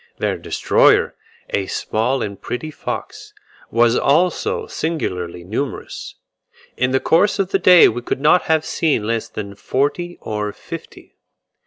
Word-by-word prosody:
Their - - -1
destroyer, - - +3 0.4
a 95 -1 -1
small 120 +8 -1
and 100 -2 -6
pretty 155 +6 -5
fox, - - -6 0.3
was 115 +1 +3
also 185 - +1
singularly 90 - -3
numerous; 115 +9 -5 0.6
in 125 +1 +1
the 130 +1 +2
course 195 +9 +3
of 195 -1 -1
the 195 - +2
day 180 -1 +8
we 120 +2 -2
could 120 - -3
not 155 +5 +4
have 160 -1 +1
seen 145 -10 0
less 115 0 -1
than 100 -2 -6
forty 145 - -2
or 105 -1 -3
fifty. - - -10
130 Hz, 140 wpm, -19 LUFS, 110-165 Hz, 0.6 s, day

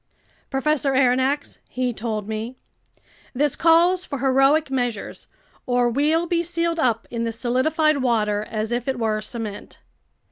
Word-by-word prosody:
"Professor 275 0 0
Aronnax," 260 +2 +1
he 250 -1 -2
told 215 -2 -4
me, 220 +4 -5 0.8
"this 290 +2 +1
calls 345 +2 +4
for 280 - -5
heroic 270 +3 +3
measures, 245 -5 -3 0.4
or 245 -1 +2
we'll 305 +6 +1
be 340 0 0
sealed 335 0 -1
up 230 -5 0
in 235 -1 -2
this 230 0 -4
solidified 305 +5 +1
water 215 -5 +1
as 215 +1 -3
if 240 +1 -2
it 265 -2 -1
were 220 -2 -1
cement." 215 -2 -7
255 Hz, 140 wpm, -22 LUFS, 230-300 Hz, 0.8 s, calls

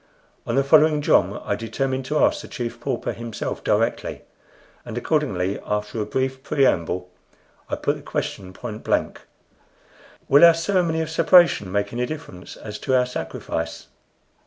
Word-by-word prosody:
On 115 - -1
the 135 - +3
following 155 +1 +5
jom - - +3
I - - -1
determined 130 +4 -2
to 150 +3 -1
ask - - +3
the - - -10
Chief 120 -1 -5
Pauper 125 0 -2
himself 115 -2 -5
directly; - - 0 0.6
and 120 -1 -7
accordingly, 105 - 0
after 105 +1 -2
a 105 - -3
brief 130 0 -2
preamble, 90 - 0 0.6
I - - -1
put - - -1
the - - -12
question 95 -1 -4
point 110 +2 -8
blank: - - -1 1.1
"Will 140 +4 +6
our 170 -1 +9
ceremony 165 -2 +1
of 160 0 -4
separation 170 - +5
make 100 +2 -1
any 125 +1 -1
difference 145 - -8
as 105 -1 -8
to 130 - 0
our 125 - +3
sacrifice?" 80 -8 -5
125 Hz, 155 wpm, -23 LUFS, 105-150 Hz, 1.1 s, our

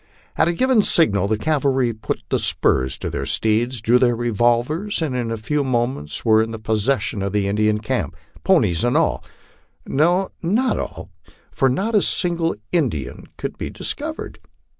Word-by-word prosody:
At - - +2
a 170 - +1
given 255 +4 +3
signal 100 - +2
the 110 +1 0
cavalry 135 -2 +1
put 110 - -4 0.2
spurs 65 -1 +2
to - - -5
their - - -3
steeds, 115 +2 +1
drew 120 +3 +4
their 120 -2 +3
revolvers, 120 - 0
and 155 -6 -2
in 120 -2 -2
a 115 - -3
few 145 +7 -1
moments 120 - -2
were 110 -1 +5
in 115 0 -2
possession 110 0 -1
of 100 0 -3
the 100 -1 +1
Indian 105 +1 +1
camp, 110 -5 -3 0.3
ponies 85 +3 +3
and 120 - +2
all - - +1 0.6
no, 175 +7 +1
not 220 +10 +1
all, - - -6 0.4
for 135 - +2
not 195 - -1
a 210 - +4
single 170 -3 0 0.2
Indian 125 - -2
could - - -6
be - - -4
dis - - -3
covered. - - -7
120 Hz, 165 wpm, -21 LUFS, 110-155 Hz, 0.6 s, were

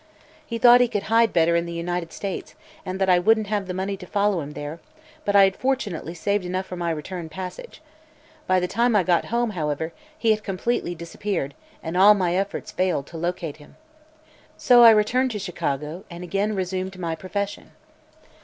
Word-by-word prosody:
He 230 - -5
thought 240 +1 +7
he 245 - +4
could 210 -4 -2
hide 230 -1 +5
better 170 0 +3
in 170 0 0
the - - -6
United 170 0 -3
States 195 -2 -6 0.3
and 185 +1 -5
that 190 - +2
I 180 -1 +5
wouldn't 220 +3 +3
have 205 -2 -2
the 180 - -3
money 195 +2 -2
to 180 -2 -11
follow 200 -3 +1
him 145 0 -7
there, 145 +3 -6 0.5
but 205 - +1
I 200 - +8
had 195 0 +3
fortunately 205 -11 -2
saved 200 +3 0
enough 185 +1 -3
for 185 - -7
my 175 -1 -2
return 165 +1 -5
passage. 190 - -8 0.6
By 185 0 +3
the 180 - -1
time 235 +4 +1
I 200 - +4
got 175 -1 +2
home, 235 -1 0
however, 160 -2 -3 0.2
he 230 -7 +2
had 215 -1 0
completely 195 -1 -2
disappeared 170 -3 -4 0.3
and 160 +1 -4
all 200 +3 +7
my 180 -3 0
efforts 195 +2 -3
failed 180 -7 0
to 165 - -9
locate 170 -3 -3
him. 145 - -17 0.8
So 245 -2 +6
I 235 - +10
returned 225 +4 +3
to - - -3
Chicago 160 -3 -4
and 170 0 -8
again 200 +4 -1
resumed 190 0 -3
my 170 -3 -3
profession. 195 +5 -4
185 Hz, 195 wpm, -24 LUFS, 170-210 Hz, 0.8 s, I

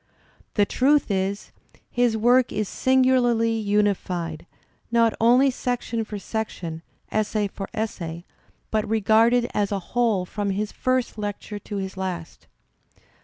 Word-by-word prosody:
The 205 - +4
truth 275 +2 +2
is, 195 +1 -2 0.4
his 245 -2 +2
work 245 +3 +4
is 215 -1 -1
singularly 255 -3 +3
unified, 200 -6 -1 0.4
not 230 -1 +4
only 250 +4 +5
section 245 -2 -2
for 210 -1 -6
section, 185 -6 -4 0.3
essay 215 -1 0
for 195 0 -7
essay, 175 -6 -4 0.5
but 215 -1 0
regarded 225 +3 +4
as 205 -1 0
a 200 - +1 0.2
whole 230 -6 +2
from 205 +2 -3
his 205 +2 -2
first 255 -3 -1
lecture 205 0 -5
to 205 +1 -6
his 190 0 -5
last. 180 -3 -5
215 Hz, 125 wpm, -24 LUFS, 195-235 Hz, 0.5 s, only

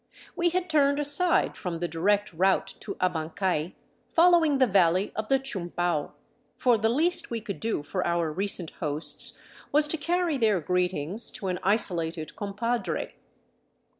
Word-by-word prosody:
We 345 -1 +2
had 365 +1 -2
turned 285 -3 +2
aside 295 +5 +2
from 175 -3 -4
the 175 +1 -2
direct 200 +5 0
route 190 +3 +2
to 200 - -6
Abancay, 170 0 -2 0.3
following 335 -4 +4
the 260 - +4
valley 185 -3 +2
of 215 +1 -3
the 270 - +3
Chumbau, 175 - -2 0.4
for 240 -3 +3
the 220 +2 +2
least 325 +9 +1
we 235 - -3
could 210 -3 -7
do 220 -9 -2
for 180 +5 -3
our 170 -2 0
recent 185 -1 -2
hosts 150 0 -1 0.3
was 300 +1 +4
to 325 - -1
carry 340 -2 0
their 215 -5 +2
greetings 180 +3 0
to 195 - -5
an 180 -1 -2
isolated 170 -6 +1
compadre. 230 +4 -3
200 Hz, 150 wpm, -27 LUFS, 175-270 Hz, 0.4 s, following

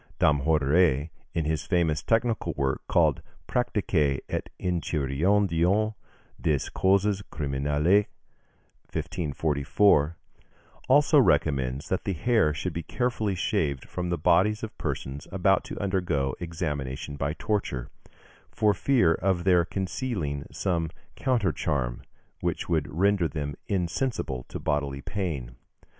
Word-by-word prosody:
Damhoudère, 75 +1 +3 0.2
in 80 - 0
his 80 0 -1
famous 85 -5 +1
technical 115 +3 +1
work, 65 -1 0
called - - +3 0.3
"Practique 85 - +1
et - - -3
Enchiridion 90 +5 +1 0.5
des 75 -5 0
Causes 100 +1 +2
Criminelles" 75 +7 +1 0.8
(1544), 75 +1 +1 0.7
also 145 +2 +6
recommends 70 - +2
that 95 - -1
the 100 - 0
hair 95 -2 +2
should 75 - -3
be 85 - -3
carefully 110 -2 -1
shaved 85 - -1
from 90 -1 -4
the 85 - 0
bodies 105 +8 +3
of 110 0 -6
persons 70 -3 -4
about 95 0 +2
to - - -6
undergo 90 -9 0
examination 75 -5 -4
by 70 +1 -1
torture, 90 - -2 0.6
for 105 -1 +2
fear 100 -5 +3
of 90 0 0
their 90 -2 +4
concealing 90 - -3
some 85 -4 -1 0.3
countercharm 75 - 0 0.4
which - - -2
would 80 -4 0
render 95 +2 +2
them 75 -1 -4
insensible 90 - -2
to - - -6
bodily 70 -2 -1
pain. 70 -13 -4
85 Hz, 115 wpm, -27 LUFS, 70-100 Hz, 0.8 s, also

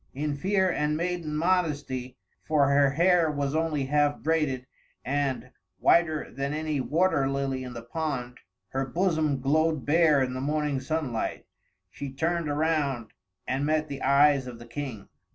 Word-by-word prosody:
In 145 +1 -2
fear 190 +5 +1
and 150 -3 0
maiden 170 -3 -2
modesty 150 -7 -1 0.3
for 145 -3 +2
her 140 0 +4
hair 170 +3 +3
was 145 -1 -2
only 155 -3 0
half 145 +1 +2
braided, 150 -5 0 0.4
and, 140 -1 -1 0.3
whiter 160 -3 +2
than 140 +3 -3
any 155 -2 -1
water 150 -2 +2
lily 135 -1 -2
in 125 -1 -7
the 115 -1 -7
pond, 125 -2 -4 0.3
her 135 +1 -1
bosom 155 -1 0
glowed 155 +2 +1
bare 155 -2 +4
in 125 -1 -3
the 130 - -4
morning 150 -1 0
sunlight 130 -4 -3 0.5
she 140 +6 -6
turned 165 +3 -1
around, 145 -6 0 0.4
and 130 +2 -1
met 155 +1 0
the 140 - -6
eyes 140 -1 +4
of 120 -2 -8
the 120 - -11
King. 120 -4 -6
145 Hz, 150 wpm, -27 LUFS, 135-155 Hz, 0.5 s, her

